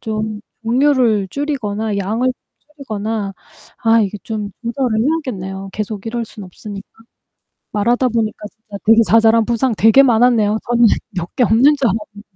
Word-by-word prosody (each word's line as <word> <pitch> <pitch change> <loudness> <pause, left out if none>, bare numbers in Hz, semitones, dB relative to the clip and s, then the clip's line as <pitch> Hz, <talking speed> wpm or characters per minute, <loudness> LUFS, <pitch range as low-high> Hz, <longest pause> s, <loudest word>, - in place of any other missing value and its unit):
좀 215 -2 -4 0.2
종류를 240 -4 +2
줄이거나 220 -7 -3
양을 225 +6 0 0.4
줄이거나 215 -6 -4 0.5
아 225 0 +3
이게 205 0 -3
좀 210 -2 -4
조절을 235 -1 -1
해야겠네요. 195 - -3
계속 210 -1 -5
이럴 235 +1 -3
순 210 -2 -11
없으니까. 195 +2 -10 0.8
말하다 240 +5 +1
보니까 220 -2 -2
진짜 220 -2 -12
되게 225 +1 +6
자잘한 225 0 +4
부상 240 +1 0
되게 225 +6 +6
많았네요. 230 -4 +3
저는 240 -1 +4 0.3
몇 175 -1 -5
개 255 - +4
없는 235 +8 +4
줄 275 - 0
알았는데. 205 0 -5
220 Hz, 325 characters per minute, -17 LUFS, 210-240 Hz, 0.8 s, 되게